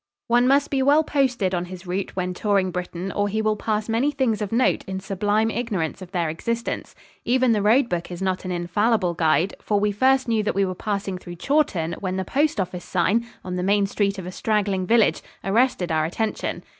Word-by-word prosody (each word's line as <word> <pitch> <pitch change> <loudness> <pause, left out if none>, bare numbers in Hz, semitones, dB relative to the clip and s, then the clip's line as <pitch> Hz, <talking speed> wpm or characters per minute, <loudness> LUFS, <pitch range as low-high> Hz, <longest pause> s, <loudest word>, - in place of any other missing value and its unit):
One 240 +1 +4
must 280 +2 +3
be 270 -1 +1
well 290 +4 +5
posted 255 -11 0
on 175 -1 -1
his 185 0 -10
route 185 +2 -3
when 180 -1 -2
touring 195 -1 +1
Britain 180 +1 -4
or 205 0 0
he 215 +2 -1
will 215 0 +1
pass 215 0 -2
many 230 +5 +1
things 260 -7 0
of 205 - -3
note 240 +3 +2
in 190 0 -4
sublime 205 +3 0
ignorance 200 -10 -2
of 185 - -9
their 175 -4 0
existence. 230 +9 -3 0.3
Even 255 0 +3
the 215 -2 +2
road 235 +6 +4
book 175 -5 -3
is 175 -1 -6
not 190 -1 -1
an 185 - -4
infallible 180 +2 +1
guide, 160 +2 +2
for 205 -1 +1
we 210 0 +1
first 260 +5 +2
knew 225 -2 +2
that 210 - -1
we 195 0 +3
were 185 - -3
passing 200 -1 -3
through 175 -1 -9
Chawton 185 - 0
when 185 -1 -3
the 190 - -2
postoffice 200 - 0
sign, 200 +6 +1 0.2
on 180 0 -3
the - - -1
main 200 +2 +2
street 200 0 0
of 190 - -6
a 180 - -5
straggling 200 -2 0
village, 230 0 +3 0.2
arrested 195 -4 +1
our 155 -1 +2
attention. 215 +6 -3
200 Hz, 210 wpm, -23 LUFS, 180-230 Hz, 0.3 s, well